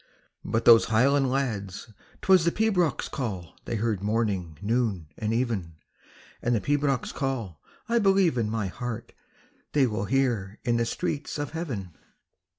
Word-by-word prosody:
But 115 - -1
those 115 -1 +8
highland 135 +4 +3
lads, 110 -6 -3 0.3
'twas 190 -3 +6
the 170 - +3
pibroch's 180 - +1
call 95 -10 -5
They - - -2
heard 110 -3 -1
morning, 100 -7 -1
noon, 105 -7 -1
and 110 0 -2
even, 115 -9 -1 0.7
And 120 0 +1
the - - +2
pibroch's 140 -1 0
call, 120 - -3 0.3
I 235 0 +2
believe 195 - +4
in 115 -3 0
my 110 -2 -1
heart, 115 +4 -5 0.6
They 145 -3 +4
will 110 -3 -2
hear 115 -6 0
in 120 -1 +1
the 115 0 +1
streets 145 +6 -3
of 145 -1 -3
heaven. 120 - -5
115 Hz, 150 wpm, -27 LUFS, 105-140 Hz, 0.7 s, those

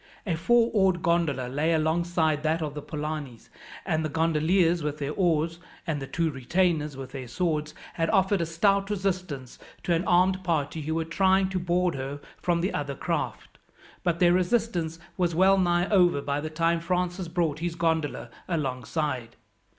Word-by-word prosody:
A 185 - 0
four 235 +8 +3
oared 190 -4 +2
gondola 165 -7 +1
lay 150 +6 0
alongside 160 -1 +1
that 160 +1 0
of 150 -2 -4
the 150 - -6
Polanis, 150 -5 -6 0.4
and 160 0 0
the 155 - -2
gondoliers 165 +3 +2
with 150 0 -3
their 145 -1 -3
oars, 165 -2 +1 0.3
and 155 -4 -2
the 135 - -5
two 165 +3 0
retainers 150 +1 0
with 135 -1 -7
their 130 -2 -7
swords, 150 +3 -2 0.2
had 165 -1 -1
offered 190 -2 +3
a - - +1
stout 195 +4 +2
resistance 185 -10 -3 0.2
to 175 - +1
an 165 +1 +1
armed 185 +2 +3
party 160 -3 -1
who 160 +2 -2
were 165 0 -1
trying 190 +3 +2
to 190 -1 -1
board 175 0 +1
her 135 +2 -5 0.2
from 170 -1 +1
the 185 - -1
other 140 -1 -3
craft, - - -4 0.4
but 175 -2 +1
their 175 0 +4
resistance 180 -4 0 0.2
was 175 -3 +1
well 190 +2 +5
nigh 175 0 +2
over 180 -7 +4
by 140 +1 -2
the 155 - -4
time 165 +2 +1
Francis 180 +1 -1
brought 165 -3 -1
his 170 0 -3
gondola 160 -7 -1 0.2
alongside. 130 -4 -2
165 Hz, 175 wpm, -27 LUFS, 150-180 Hz, 0.4 s, well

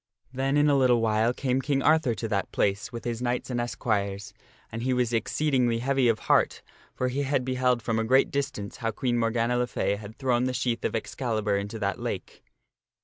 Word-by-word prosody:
Then 135 +2 0
in 145 0 +4
a 145 - +4
little 125 -3 +4
while 110 +1 +2
came 130 +1 -1
King 135 -1 0
Arthur 155 -6 +3
to 110 +3 -4
that 100 -3 -2
place 105 +4 0
with 115 -2 -7
his 120 -1 -3
knights 125 +1 -2
and 120 -1 0
esquires, 105 -3 -2 0.4
and 115 - -5
he 130 +2 0
was 125 -1 0
exceedingly 125 0 +1
heavy 135 +1 +1
of 115 -2 +3
heart, - - +2 0.3
for 130 - 0
he 135 +3 -2
had 135 -2 0
beheld 125 -2 +1
from 115 0 0
a - - +1
great 130 +4 +3
distance 140 -8 -3
how 115 - -2
Queen 120 +2 -1
Morgana 115 +1 +1
le 125 - +1
Fay 100 -4 -1
had 105 +1 -10
thrown 125 -2 +1
the 130 - -1
sheath 120 -2 -1
of - - -1
Excalibur 110 -3 -1
into 100 +3 -3
that 100 -4 -2
lake. - - -5
120 Hz, 205 wpm, -27 LUFS, 110-130 Hz, 0.4 s, in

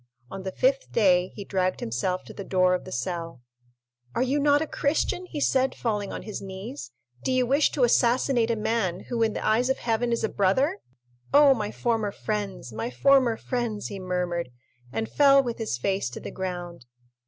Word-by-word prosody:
On 195 - -6
the 190 0 -4
fifth - - +1
day 185 -5 +4
he 200 - -7
dragged 185 -2 0
himself 180 +11 -2
to - - -11
the 200 - -7
door 185 -1 +2
of 180 - -2
the - - -9
cell. 165 0 -4 0.7
"Are 245 - +2
you 270 +3 +1
not 290 0 +4
a 320 - -1
Christian?" 320 +5 -1
he 305 - -5
said, 265 -1 +2
falling 210 -4 -2
on - - -6
his 215 - -6
knees. 190 -10 -7 0.3
"Do - - 0
you 255 -1 +2
wish 280 +4 +3
to 275 - +1
assassinate 240 0 +3
a 230 - +2
man 210 -5 -1
who, 235 -1 -1
in 220 -1 +2
the - - -4
eyes 230 +4 +2
of 265 - +1
Heaven, 235 +1 0
is 235 - 0
a - - +3
brother? 265 - +1 0.5
Oh, 285 -1 +7
my 210 -5 -3
former 225 -4 -1
friends, 200 - -4
my 110 +2 -3
former 245 - +3
friends!" 235 -4 -3
he 200 - -6
murmured, 180 -4 -2 0.4
and 220 +11 -2
fell 275 -1 +5
with 240 -2 -4
his 220 - -2
face 190 +2 -1
to 120 - -8
the - - -7
ground. 175 -6 -6
215 Hz, 200 wpm, -26 LUFS, 185-255 Hz, 0.7 s, Oh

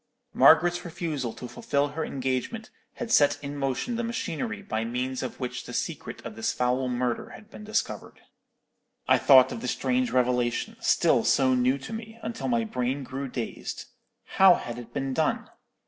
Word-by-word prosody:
Margaret's 175 0 +5
refusal 155 -8 -3
to 125 - -8
fulfil 145 - -1
her 160 +3 -4
engagement 135 - -3 0.2
had 235 -2 -5
set 145 -5 +5
in 140 0 -5
motion 140 - -2
the 235 - -1
machinery 225 -1 -3
by 110 - -2
means 125 +2 -3
of - - -5
which 125 -2 -4
the - - -8
secret - - -4
of 115 -2 -7
this 110 - -1
foul 125 +1 0
murder 125 -1 -2
had 215 +1 -13
been 215 - -10
discovered. 215 +1 -3 0.9
"I - - +5
thought 130 -2 +7
of 115 - -5
the 125 - -4
strange 125 0 0
revelation, 125 -1 0
still - - +3
so 130 -1 +3
new 125 +2 +2
to 140 +11 -8
me, 225 0 -7
until 225 +1 -4
my 235 -2 +1
brain 135 - -2
grew 135 +2 -5
dazed. 120 -3 -5 0.4
How 190 -2 +6
had 120 0 -6
it 120 - -11
been 135 -1 -2
done? 155 +3 0
135 Hz, 175 wpm, -27 LUFS, 125-190 Hz, 0.9 s, thought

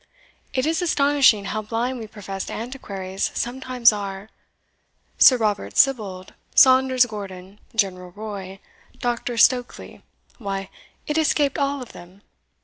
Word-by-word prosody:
It 260 -2 -1
is 320 +2 0
astonishing 280 - +3
how 215 +2 -3
blind 235 +4 -3
we 220 - -7
professed 195 -3 -7
antiquaries 200 -6 -4
sometimes 245 -1 +2
are! 200 0 -6 0.9
Sir 255 - +8
Robert 210 -3 -2
Sibbald, 205 -9 +1 0.2
Saunders 260 -1 +6
Gordon, 200 -3 -9 0.2
General 185 -4 -1
Roy, 200 -3 -7 0.4
Dr. 240 0 -3
Stokely, 245 +2 +1 0.4
why, 195 -3 -5 0.3
it 300 +1 0
escaped 295 -3 +1
all 280 -1 -1
of 245 - -13
them. 185 +4 -15
220 Hz, 120 wpm, -22 LUFS, 195-260 Hz, 0.9 s, Sir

